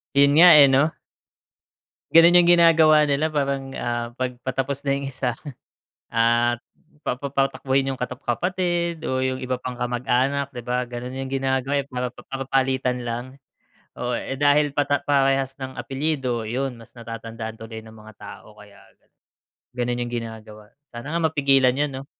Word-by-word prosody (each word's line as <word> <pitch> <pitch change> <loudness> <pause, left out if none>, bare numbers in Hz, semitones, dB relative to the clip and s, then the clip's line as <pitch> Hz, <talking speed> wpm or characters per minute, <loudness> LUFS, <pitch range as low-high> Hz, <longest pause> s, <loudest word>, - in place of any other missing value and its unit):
'Yun 140 0 +5
nga, 180 +1 +10
eh, 140 - +9
'no? 135 +3 +3 1.3
Gano'n 170 +2 +8
'yung 175 - +3
ginagawa 165 -3 +6
nila 145 +1 +1
parang, 140 -3 -2
ah, 120 0 -3
'pag 125 -1 -4
patapos 135 +2 -3
na 140 - +2
yung 140 0 -5
isa, 125 -2 -2 0.8
at 120 +1 +2 0.4
pa 125 - -2
papatakbuhin 135 0 -1
'yung 135 - -2
katap 125 +1 -5
kapatid 175 +4 -1
o 130 0 -1
'yung 130 0 -2
iba 130 0 -2
pang 125 0 -7
kamag-anak, 130 +3 0
'di 125 - -6
ba? 125 +1 -2
Ganun 125 +1 -7
'yung 135 0 -5
ginagawa, 135 0 -1
eh, 140 - -10
para 125 -1 -4
pap - - -15
parang 135 0 -5
papalitan 130 -1 0
lang. 120 0 -4 0.7
Oo, 125 0 -2
eh, 135 +2 -4
dahil 145 +1 +3
patap 145 0 0
parehas 135 -1 +1
ng 130 -1 -7
apelyido, 135 -5 -2
'yun, 125 +2 -3
mas 115 - -16
natatandaan 115 -1 -8
tuloy 110 0 -9
ng 110 0 -14
mga 110 0 -14
tao 105 +1 -12
kaya 105 -1 -17 0.2
ganun, - - -42 0.6
ganun 120 0 -2
'yung 120 - -8
ginagawa. 110 -2 -8 0.2
Sana 120 +5 -8
nga 170 - 0
mapigilan 135 -4 +3
'yun, 145 +1 -1
'no? 135 +1 -8
130 Hz, 165 wpm, -23 LUFS, 120-140 Hz, 1.3 s, nga